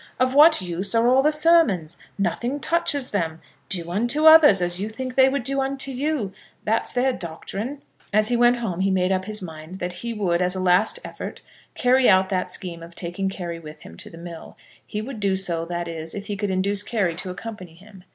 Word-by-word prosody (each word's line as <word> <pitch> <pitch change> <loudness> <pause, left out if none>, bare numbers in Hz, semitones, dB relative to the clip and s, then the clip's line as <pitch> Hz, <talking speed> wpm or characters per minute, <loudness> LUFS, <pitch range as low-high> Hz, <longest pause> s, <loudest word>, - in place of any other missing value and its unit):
"Of 255 0 +2
what 300 - +6
use 180 +5 -1
are 230 +1 +3
all 260 +2 +5
the 300 +2 +3
sermons? 300 - +3 0.2
Nothing 235 - -2
touches 295 -5 0
them. 165 -5 -2 0.3
Do 170 -2 -2
unto 240 - 0
others 315 - +8
as 175 0 +1
you 210 - -3
think 255 +3 -6
they 265 0 +5
would 275 -1 -2
do 275 +2 -1
unto 270 0 -2
you. 265 -6 -2 0.3
That's 225 +2 0
their 255 +1 +1
doctrine." 200 - -6 0.3
As 215 +2 +2
he 245 - +1
went 240 +1 +4
home 200 -7 -4
he 195 +1 +1
made 185 -1 +1
up 185 0 0
his 215 -1 -5
mind 160 +1 -9
that 180 -1 -4
he 235 - -4
would, 185 -6 0
as 180 +1 +1
a - - -3
last 185 - +3
effort, - - -7 0.3
carry 255 +1 +4
out 190 0 +4
that 185 -2 -1
scheme 170 -3 -5
of 170 +1 -12
taking 180 +2 -3
Carry 175 -3 -6
with 155 -1 -12
him 80 - -12
to - - -10
the 165 - -13
mill; 170 -1 -10 0.3
he 210 0 -5
would 250 -1 -7
do 200 -2 +1
so, 170 -3 0
that 175 0 -4
is, 165 -1 -6
if 200 0 -6
he 205 - -4
could 205 0 -3
induce 195 +2 +2
Carry 205 -5 -1
to 180 +1 -5
accompany 185 -3 -8
him. 195 +1 -16
200 Hz, 220 wpm, -23 LUFS, 175-250 Hz, 0.3 s, others